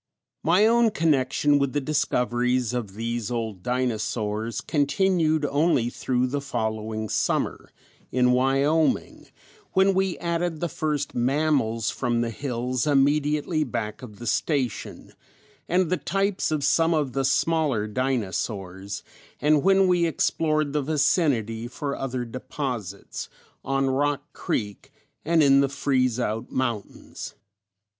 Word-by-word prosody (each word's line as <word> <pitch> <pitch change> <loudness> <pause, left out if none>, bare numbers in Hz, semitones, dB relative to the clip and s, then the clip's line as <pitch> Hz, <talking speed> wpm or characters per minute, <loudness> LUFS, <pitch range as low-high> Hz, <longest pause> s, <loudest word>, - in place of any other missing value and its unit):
] - - -60
My 195 +5 +5
own 235 0 +4
connection 145 -5 +2
with 140 -2 0
the 145 - +1
discoveries 125 -4 0
of 110 -6 -4
these 115 0 -3
old 110 -6 -3
dinosaurs 110 -2 -2
continued 160 +1 +1
only 140 -4 +2
through 125 0 0
the 140 +3 -2
following 110 -4 -3
summer, - - -1 0.4
in 125 0 +3
Wyoming, 135 +5 +1 0.5
when 190 0 +4
we 190 -1 0
added 170 -1 -2
the 175 - -1
first 150 -2 -2
mammals 125 -4 +1
from 120 -2 -1
the 115 -1 -1
hills 125 +2 -2
immediately 150 +2 +2
back 110 -3 -4
of 110 -5 -10
the 120 - -8
station, 125 - -2 0.6
and 180 -1 +2
the 185 - +2
types 195 0 0
of 155 -2 -1
some 165 +3 +3
of 145 -5 -1
the 135 - 0
smaller 140 -4 +1
dinosaurs, 100 -5 -3 0.4
and 150 0 +3
when 195 +1 +4
we 175 -2 +3
explored 155 -1 0
the 150 - +1
vicinity 135 - +1
for 140 +3 -4
other 130 -2 -3
deposits, 120 - -5 0.3
on 135 0 0
Rock 145 +2 -1
Creek 105 -2 -3 0.3
and 165 0 +3
in 140 -1 +6
the 140 - +1
Freeze 130 -3 +1
Out 115 0 -2
Mountains. 120 -6 -4
135 Hz, 130 wpm, -25 LUFS, 120-155 Hz, 0.6 s, in